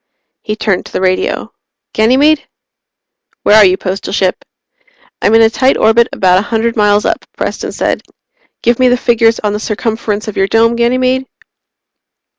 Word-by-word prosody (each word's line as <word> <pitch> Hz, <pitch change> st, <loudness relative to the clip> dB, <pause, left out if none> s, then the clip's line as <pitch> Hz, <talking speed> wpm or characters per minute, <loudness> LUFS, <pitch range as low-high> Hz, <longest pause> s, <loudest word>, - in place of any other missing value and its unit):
He 215 Hz, -, -4 dB
turned 210 Hz, -4 st, -2 dB
to -, -, -15 dB
the -, -, -3 dB
radio. 185 Hz, 0 st, -1 dB, 0.4 s
"Ganymede?" 270 Hz, +7 st, +2 dB, 1.0 s
"Where 210 Hz, -, +4 dB
are 215 Hz, -, +7 dB
you, 185 Hz, 0 st, +2 dB
Postal 195 Hz, 0 st, -5 dB
Ship?" 190 Hz, -2 st, 0 dB, 0.9 s
"I'm 215 Hz, -, +3 dB
in 225 Hz, -, +6 dB
a 220 Hz, -, +5 dB
tight 260 Hz, +3 st, +1 dB
orbit 230 Hz, +1 st, +3 dB
about 185 Hz, -1 st, +2 dB
a 205 Hz, -, -6 dB
hundred 230 Hz, 0 st, -1 dB
miles 210 Hz, -1 st, +2 dB
up," -, -, -1 dB
Preston -, -, -4 dB
said. -, -, -2 dB, 0.6 s
"Give 240 Hz, +1 st, +1 dB
me 255 Hz, -, +4 dB
the 250 Hz, 0 st, +2 dB
figures 230 Hz, -2 st, +2 dB
on 210 Hz, -1 st, -1 dB
the 210 Hz, -, -3 dB
circumference 215 Hz, 0 st, -3 dB
of 215 Hz, -, -6 dB
your 195 Hz, -, +1 dB
Dome, 225 Hz, +3 st, +2 dB
Ganymede?" 255 Hz, +2 st, 0 dB
225 Hz, 165 wpm, -13 LUFS, 205-235 Hz, 1.0 s, are